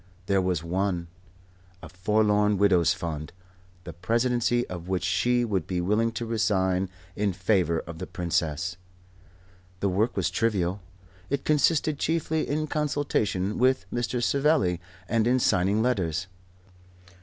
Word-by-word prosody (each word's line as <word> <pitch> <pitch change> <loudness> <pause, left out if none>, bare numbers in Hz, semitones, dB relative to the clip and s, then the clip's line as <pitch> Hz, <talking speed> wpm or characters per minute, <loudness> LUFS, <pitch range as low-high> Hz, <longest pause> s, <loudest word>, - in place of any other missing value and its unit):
There 100 -1 +2
was 90 -3 -1
one, 90 0 -1 0.7
a - - -7
Forlorn 105 +2 +2
Widows' 95 -4 +4
Fund, 80 -4 -4 0.5
the 85 - -8
presidency 120 +6 +1
of 90 -1 -7
which 95 -1 -1
she 120 +6 +2
would 95 -7 -1
be 90 -1 -1
willing 105 +6 +1
to 115 - -3
resign 95 -4 +1 0.3
in 105 -2 0
favour 90 -3 +1
of 85 -1 -9
the 90 - -5
Princess. 85 0 -2 1.0
The 100 - +1
work 105 +6 0
was - - +1
trivial: 100 -4 0 0.5
it 140 0 -2
consisted 150 0 +2
chiefly 160 -1 0
in 155 +2 0
consultation 140 -10 -1
with 130 +1 +3
Mr. 120 0 -1
Savelli 135 - +2 0.3
and 115 +2 +1
in 125 +1 +4
signing 100 -2 +2
letters. 90 -9 0
100 Hz, 130 wpm, -26 LUFS, 90-120 Hz, 1.0 s, Widows